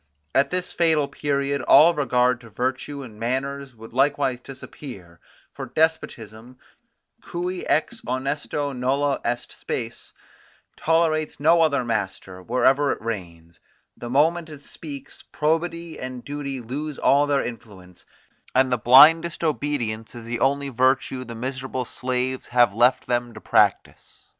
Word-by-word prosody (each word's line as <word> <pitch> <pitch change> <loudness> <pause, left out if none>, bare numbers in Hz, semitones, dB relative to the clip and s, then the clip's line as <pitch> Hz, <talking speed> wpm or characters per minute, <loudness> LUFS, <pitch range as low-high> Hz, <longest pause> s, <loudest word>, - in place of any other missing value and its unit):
At 135 - +3
this 180 0 -3
fatal 160 -4 +2
period 140 -1 -1
all 160 +5 +7
regard 125 -4 +1
to 115 - -14
virtue 130 +5 -3
and 110 -4 -12
manners 135 +2 -3
would 115 0 -13
likewise 135 -1 +1
disappear; 125 - -11 0.3
for - - -7
despotism, 125 -7 -2 0.6
cui 180 +1 -4
ex 225 +9 0
honesto 140 +2 -3
nulla 135 +3 0
est 120 +1 -3
spes, 115 -2 -5 0.6
tolerates 160 -1 +1
no 165 +3 +4
other 140 -5 +2
master, 95 -4 -3
wherever 130 +6 +2
it - - -3
reigns; 85 -7 -7 0.4
the 120 - -8
moment 160 +5 +2
it 150 -2 -10
speaks, 145 -1 -9
probity 165 +2 -1
and 130 -1 -7
duty 140 -2 -4
lose 145 +5 -5
all 145 +1 +3
their 140 -1 +1
influence, 100 -6 -10 0.5
and 130 0 +3
the 125 - +1
blindest 160 +9 +6
obedience 135 -9 -2
is 115 -1 -9
the 115 0 -3
only 140 +1 +1
virtue 130 0 +1
the 115 -2 -8
miserable 130 +1 -4
slaves 130 +1 -3
have 120 -4 +3
left 120 +4 +3
them 120 -1 -2
to - - -8
practise. - - 0
130 Hz, 135 wpm, -23 LUFS, 120-145 Hz, 0.6 s, all